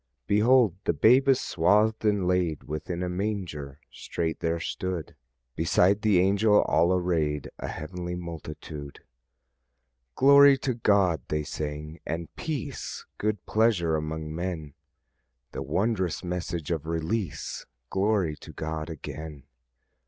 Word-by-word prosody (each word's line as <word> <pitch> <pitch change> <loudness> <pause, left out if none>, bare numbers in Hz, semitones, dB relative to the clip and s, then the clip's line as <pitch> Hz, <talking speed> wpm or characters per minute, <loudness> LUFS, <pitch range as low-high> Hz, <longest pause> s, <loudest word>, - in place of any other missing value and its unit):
"Behold 110 0 +4
the - - +2
babe 125 - +5
is 135 - +5
swathed, 105 +6 +2
and 105 -4 +2
laid 90 -4 0
Within 85 +4 -4
a - - -1
manger." 90 -8 -4
Straight 80 -1 -3
there 85 0 -1
stood 90 -1 -4 0.4
Beside 90 +5 +3
the 105 -4 +4
angel 100 +3 +4
all 85 +2 +3
arrayed 80 -6 0
A - - -4
heavenly 90 +2 -5
multitude. 80 -4 -8 1.1
"Glory 140 0 +7
to 130 -1 -1
God," 100 - +2
they 75 0 -1
sang; 75 +1 -5
"and 85 +1 -5
peace, 150 - -5
Good 105 -2 -1
pleasure 105 -8 +2
among 80 0 -4
men." 80 -4 -4 0.8
The - - -5
wondrous 95 -4 -1
message 85 -2 -3
of 80 -2 -2
release! 85 +2 -3 0.2
Glory 95 -5 +1
to - - -11
God 80 0 -4
again! 75 -2 -7
90 Hz, 125 wpm, -27 LUFS, 80-105 Hz, 1.1 s, Glory